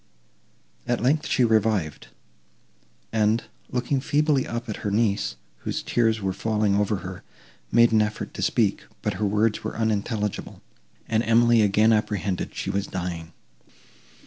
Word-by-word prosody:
At 120 - +1
length, 145 +5 +1
she 130 - +2
revived, 110 -8 +1 1.1
and, 110 +1 +2 0.3
looking 125 +2 -1
feebly 145 -1 +1
up 120 +2 -4
at 110 - -4
her 105 - -3
niece, 100 -1 0 0.2
whose - - -4
tears 115 -2 +1
were 95 -2 -2
falling 105 0 0
over 105 +1 +1
her, 95 -1 -7 0.5
made 120 0 +5
an 110 -1 +4
effort 105 0 -3
to - - -6
speak, - - +1 0.2
but 105 - 0
her - - +2
words 105 +2 +1
were 110 - -4
unintelligible, 105 -1 -2 0.4
and 110 -1 +1
Emily 115 0 +4
again 105 +2 +4
apprehended 105 -3 -1
she 95 - -3
was 100 0 -2
dying. 85 -3 -5
110 Hz, 145 wpm, -25 LUFS, 100-115 Hz, 1.1 s, made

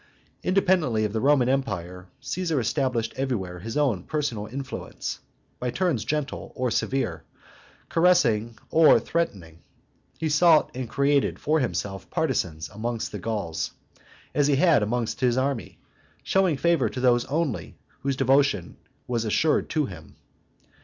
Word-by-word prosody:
Independently 180 - +2
of 105 - -3
the 110 - -1
Roman 135 -3 +4
empire, 90 -9 -2
Caesar 165 -5 -1
established 120 -2 -1
everywhere 100 -10 -2
his 115 +7 -5
own 130 -11 +1
personal 130 -8 -2
influence; 135 +3 -6 0.4
by 125 - -2
turns 165 - 0
gentle 150 -2 -3
or 125 -2 -1
severe, 135 +3 -1 0.6
caressing 120 -11 +3
or 160 -1 +6
threatening, 90 - -3 0.6
he 160 - -1
sought 155 +1 +4
and 125 -2 -5
created 140 +3 +2
for 155 +2 +1
himself 100 -7 -3
partisans 80 -2 -1
amongst 115 +3 -4
the 105 - -5
Gauls, 100 -6 -3 0.6
as 145 -1 +3
he 145 - +3
had 155 -3 +4
amongst 115 +2 -1
his 125 -1 +2
army, 130 -2 -2 0.5
showing 190 -6 +2
favor 170 -3 +2
to 130 - -6
those 120 -1 +3
only 150 -4 -2 0.2
whose 135 0 -1
devotion 135 -8 +2 0.3
was 120 -2 -1
assured 150 +8 +1
to 155 -2 +1
him. 85 - -11
130 Hz, 135 wpm, -25 LUFS, 110-150 Hz, 0.6 s, or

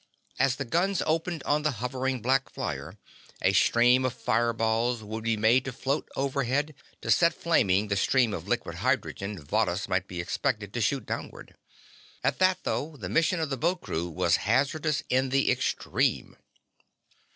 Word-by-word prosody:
As 130 -1 +3
the 135 - -4
guns 180 +9 +1
opened 165 0 -1
on 150 +1 +1
the 150 -1 0
hovering 130 +1 -2
black 135 +2 +2
flyer - - -5 0.5
a - - +4
stream 125 +2 +4
of 130 -1 0
fire 115 +1 +1
balls 115 +1 0
would 110 +1 -6
be 115 -1 0
made 115 +4 +4
to 135 - -3
float 135 +4 -2
overhead 140 +2 -1 0.3
to 115 - -1
set 170 +11 +4
flaming 105 - +2
the 100 - 0
stream 115 +3 +2
of 85 - -6
liquid - - -2
hydrogen 100 +1 -1
Varrhus 75 -4 -1
might - - -1
be 90 - -6
expected 105 +3 -2
to 120 - -2
shoot 135 +5 0
downward. - - -7 0.7
At - - 0
that, 185 0 +3
though, 150 +1 -3
the - - -6
mission 165 +2 +2
of 155 -3 -2
the 135 - -1
boat 175 +8 0
crew 85 +2 -3
was 85 -1 +2
hazardous 140 - 0
in 130 +1 +1
the 135 +1 +2
extreme. - - -1
130 Hz, 170 wpm, -27 LUFS, 110-145 Hz, 0.7 s, a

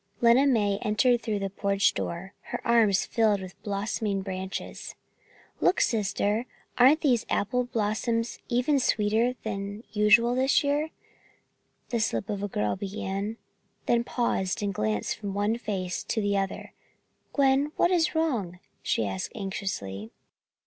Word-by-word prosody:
Lena 240 +4 +5
May 205 -6 +2
entered 240 +2 +2
through 220 -2 -1
the 195 -1 -3
porch 200 0 +2
door, 185 +3 -4
her - - -4
arms 225 -5 +4
filled 215 -3 +2
with 185 -1 -10
blossoming 205 -1 -2
branches. 190 0 -5 0.6
"Look, 365 - +3
sisters, 210 0 +1 0.3
aren't 280 +6 +5 0.2
apple 245 +5 0
blossoms 230 +1 -1
even 250 +4 +2
sweeter 230 +1 +2
than 200 0 -4
usual 215 +3 +5
this 260 +3 +3
year?" 290 +2 0 1.0
the 235 - 0
slip 215 -1 -1
of 200 -1 -3
a 205 - -1
girl 105 - -1
began, 200 - -4 0.5
then 235 0 +2
paused 210 -6 -1
and 200 -1 -1
glanced 105 - -1
from 200 -3 -5
one 210 +3 0
face 185 -5 -3
to - - -1
the 205 -1 +1
other. 195 -1 -3 0.6
"Gwen, 275 +1 +3
what 345 - +3
is 340 -2 +2
wrong?" 235 - 0 0.2
she 110 - 0
asked 95 -2 -4
anxiously. 190 - -4
210 Hz, 135 wpm, -27 LUFS, 195-240 Hz, 1.0 s, Lena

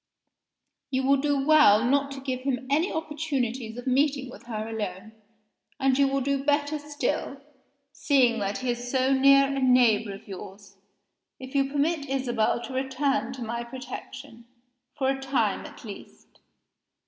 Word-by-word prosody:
You 265 -1 -1
will 275 +1 +4
do 280 -1 0
well 285 -8 +6
not 280 +2 +2
to 270 - -8
give 260 -2 -3
him 260 -1 -2
any 320 +7 +2
opportunities 270 -7 -3
of 245 - -7
meeting 270 0 +1
with - - -13
her 220 -2 -4
alone. 210 -2 -5 0.7
And 270 -1 +3
you 280 +1 +4
will 275 0 0
do 275 +1 -1
better 290 +1 +1
still 290 -1 -3 0.5
(seeing 265 -5 +2
that 200 0 -2
he 255 -1 -1
is 240 +1 -5
so 260 +1 +2
near 275 +1 +6
a 275 0 -2
neighbor 240 -5 +4
of 195 - -11
yours) 195 0 -10 0.6
if 260 0 -9
you 275 -1 +2
permit 290 0 0
Isabel 240 -3 0
to 265 - -7
return 265 -1 -1
to 255 -2 -6
my 235 +1 -3
protection, 255 0 -9 0.5
for 265 -2 0
a 270 0 0
time 270 +1 0
at - - -14
least. - - -12
265 Hz, 160 wpm, -26 LUFS, 240-280 Hz, 0.7 s, well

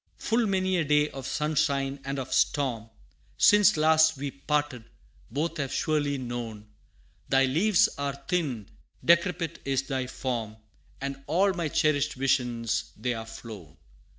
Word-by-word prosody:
Full 230 0 +1
many 190 -1 +1
a 170 - +2
day 150 0 +2
of 135 -2 -7
sunshine 140 -3 0
and 140 0 -4
of 130 -1 -4
storm, 120 -6 0 0.5
Since 205 -5 +6
last 160 0 +4
we 140 0 -4
parted, 145 -4 -2 0.4
both 160 +7 -2
have 140 -3 -3
surely 145 -3 0
known; 120 -4 -6 0.6
Thy 135 0 +4
leaves 170 +9 +3
are 140 -1 -2
thinned, 140 - -2 0.3
decrepit 170 -1 +2
is 135 -1 0
thy 130 -2 -3
form, 115 -5 -4 0.4
And 135 0 -5
all 190 +6 +2
my 170 -3 -2
cherished 150 -1 +1
visions, 120 -4 0
they 125 +3 -1
are 115 -1 -6
flown! 110 -9 -10
140 Hz, 140 wpm, -27 LUFS, 125-160 Hz, 0.6 s, Since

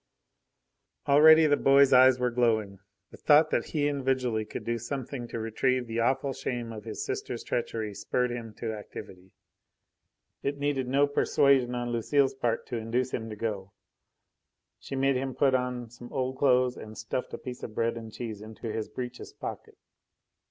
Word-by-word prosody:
Already 155 +3 +7
the 145 -1 +4
boy's 135 0 +5
eyes 130 0 +7
were 125 -1 +1
glowing. 110 -5 +1 0.3
The - - -12
thought 155 +1 +5
that - - +1
he 145 -2 0
individually 130 -5 0
could - - -7
do 120 0 -2
something 125 +1 -5
to 115 - -6
retrieve 125 +3 0
the 115 0 -3
awful 135 +3 +1
shame 120 -3 -4
of 105 -1 -9
his 110 -2 -5
sister's - - -4
treachery 110 -3 -3
spurred 125 +4 -1
him 115 -3 -6
to 115 -2 -4
activity. 95 -3 -10 1.1
It 140 +1 -2
needed 140 -2 -1
no 140 +3 +3
persuasion 140 -3 +2
on 120 0 -3
Lucile's 135 +4 +2
part 120 -4 -1
to 120 - -2
induce 120 +3 -1
him 115 -1 -4
to 105 - -6
go. 100 -3 -4 1.1
She - - -7
made 135 0 +2
him 130 0 -3
put 135 -2 +3
on 125 -2 -2
some 120 0 -12
old 130 0 -2
clothes 125 -2 +3
and 110 0 -10
stuffed 110 +3 -4
a - - -7
piece 125 -1 -8
of 110 - -7
bread 115 0 0
and 115 -1 -8
cheese 110 -3 -6
into 110 +1 -7
his 110 - -3
breeches 125 +2 -7
pocket. - - -8
125 Hz, 175 wpm, -28 LUFS, 115-135 Hz, 1.1 s, Already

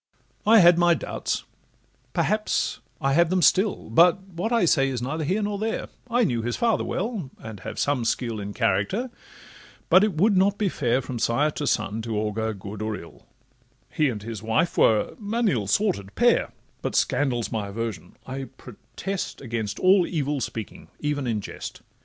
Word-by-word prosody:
I 225 -1 +8
had 175 0 +7
my 175 -1 +5
doubts, - - -3 0.7
perhaps - - 0 0.2
I 135 0 +1
have 170 +2 +4
them 185 -1 +1
still, 195 +5 +3
But 170 +9 +6
what 180 +6 -3
I 230 -6 +3
say 135 -4 +3
is 130 -2 -2
neither 145 +6 -3
here 190 +8 0
nor 205 -1 -2
there: 220 +1 -2 0.2
I 240 +1 +3
knew 120 - 0
his 120 +2 -2
father 230 -2 +2
well, 210 - -3
and 110 -3 -9
have - - -7
some 140 -4 +1
skill 115 -1 -1
In 100 0 -5
character—but 185 - -1
it 210 -2 +1
would 205 +2 +4
not 195 +2 +3
be 205 -3 +1
fair 130 -4 0
From 125 -1 -5
sire 140 +7 +2
to 145 0 -4
son 110 +3 0
to 110 -1 -3
augur 110 +1 -1
good 100 +2 -8
or 110 0 -2
ill: 85 -3 -12 0.7
He 150 -2 +2
and 105 -4 -5
his 110 -2 -6
wife 115 +10 +1
were 110 -2 +3
an 225 +3 0
ill 115 - 0
sorted 105 - 0
pair— - - +3 0.3
But - - -3
scandal 125 -5 +1
's - - -5
my 105 -2 -2
aversion—I 115 +5 -6
protest 190 - -6
Against 115 -5 -4
all 185 -1 +5
evil 145 -4 -1
speaking, 110 -2 -6
even 145 -3 -2
in 110 -3 -1
jest. - - -8
135 Hz, 175 wpm, -25 LUFS, 110-185 Hz, 0.7 s, I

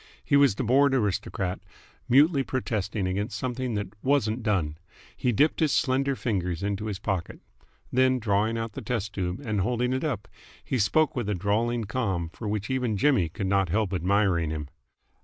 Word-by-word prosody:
He 145 - +2
was 140 -7 +5
the 130 - -2
bored 135 +3 +4
aristocrat, 95 -4 -1 0.5
mutely 140 +3 +5
protesting 110 -6 -2
against 100 +4 -2
something 125 -1 -3
that 105 -1 -4
"wasn't 125 -4 +1
done." 90 -9 -1 0.4
He 125 - 0
dipped 145 +7 +2
his 155 -3 +3
slender 135 +1 +1
fingers 90 -8 -2
into 100 +1 -2
his 105 -3 -3
pocket. 95 -3 -3 0.5
Then, 130 0 +4
drawing 110 0 +1
out 115 0 -3
the - - -6
test 105 -5 -3
tube, 90 -2 -2
and 105 -3 0
holding 125 +4 0
it 130 - -1
up, 130 -10 -2 0.4
he 130 - -1
spoke 155 +9 +2
with 120 -5 -2
a 105 - 0
drawling 110 +5 0
calm 95 -6 -2
for 110 - -6
which 105 +2 -2
even 125 -5 0
Jimmy 105 - +3
could 95 +5 -4
not 95 -1 +2
help 100 +1 0
admiring 90 -2 +2
him. 75 -2 -4
110 Hz, 175 wpm, -27 LUFS, 95-130 Hz, 0.5 s, was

